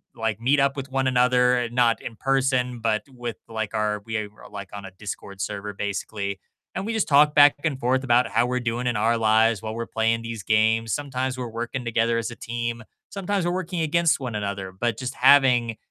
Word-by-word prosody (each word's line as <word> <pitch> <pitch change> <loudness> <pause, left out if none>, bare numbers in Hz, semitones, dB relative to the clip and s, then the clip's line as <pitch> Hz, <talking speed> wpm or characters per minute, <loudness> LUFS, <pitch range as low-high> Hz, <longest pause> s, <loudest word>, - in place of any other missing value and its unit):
like, 110 -1 -2
meet 135 +4 +2
up 140 +1 +2
with 135 0 -5
one 135 0 0
another, 125 -1 +3
not 120 -2 +2
in 115 - -7
person 130 -2 0
but 110 -1 0
with, 120 -4 -6
like, 110 -2 -4
our 105 -1 0
we 115 0 -4
are, 105 -1 -4 0.2
like, 100 -2 -8
on 100 -1 -7
a 95 - -9
Discord 100 0 -8
server 105 0 -4
basically. 100 0 -4 0.4
And 195 - -3
we 225 - -2
just 220 - 0
talk 150 +1 +5
back 145 -1 +7
and 145 -5 -1
forth 130 +2 +1
about 120 -1 +3
how 120 - +2
we're 125 0 -1
doing 120 +1 -2
in 120 - 0
our 115 +2 +2
lives 110 -1 +3
while 110 0 -5
we're 115 0 -4
playing 115 +1 0
these 115 -3 -6
games. 110 +1 +2
Sometimes 130 -2 -2
we're 125 - -4
working 120 +3 -4
together 115 0 +1
as 115 +1 -3
a 120 - -8
team. 115 0 -4 0.3
Sometimes 195 -1 -2
we're 175 - +1
working 180 -2 -3
against 160 0 +2
one 125 -5 -5
another. 100 -2 -4
But 115 +4 -2
just 130 0 -5
having 125 -4 +4
120 Hz, 210 wpm, -24 LUFS, 110-130 Hz, 0.4 s, back